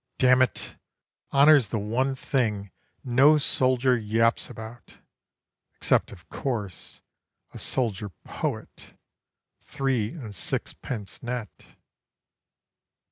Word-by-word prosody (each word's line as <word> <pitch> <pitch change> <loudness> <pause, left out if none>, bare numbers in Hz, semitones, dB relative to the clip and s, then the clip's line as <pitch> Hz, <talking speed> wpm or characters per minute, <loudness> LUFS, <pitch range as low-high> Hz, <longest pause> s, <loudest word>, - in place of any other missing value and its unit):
damn 130 0 +5
it, 130 - -1 0.5
honour's 140 -3 +6
the 110 - -2
one 120 +6 0
thing 105 -8 -1 0.3
No 135 +5 +5
soldier 130 -2 +2
yaps 115 +1 +1
about, 110 +2 -10 0.8
except - - +1
of 90 -4 -14
course 105 -9 -5 0.5
A - - -8
soldier 110 -5 -1
poet 85 - -6 0.6
three 130 -4 -1
and 120 -11 -8
sixpence 100 +3 -5
net. 120 -4 -4
120 Hz, 90 wpm, -26 LUFS, 105-130 Hz, 0.8 s, honour's